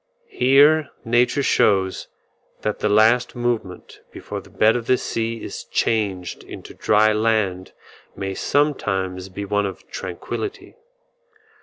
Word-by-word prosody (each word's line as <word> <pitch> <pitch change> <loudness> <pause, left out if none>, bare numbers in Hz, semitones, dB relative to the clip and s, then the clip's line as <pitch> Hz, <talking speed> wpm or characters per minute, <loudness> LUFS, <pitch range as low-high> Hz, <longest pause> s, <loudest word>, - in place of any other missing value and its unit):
Here 145 +4 +4 0.2
nature 120 +4 +2
shows 95 -6 +2 0.5
that 105 - -2
the 105 - 0
last 110 +5 +3
movement 120 -7 -3
before - - -7
the - - -18
bed 110 +1 +3
of 120 -2 -3
the 130 - +4
sea 115 -1 -3
is - - -6
changed 100 -5 -1
into - - -10
dry 110 0 +3
land 105 -4 0 0.4
may 95 0 -4
sometimes 95 -10 -1
be 100 +2 -6
one 105 0 0
of 95 - -9
tranquillity. 95 - -6
110 Hz, 125 wpm, -22 LUFS, 95-120 Hz, 0.5 s, Here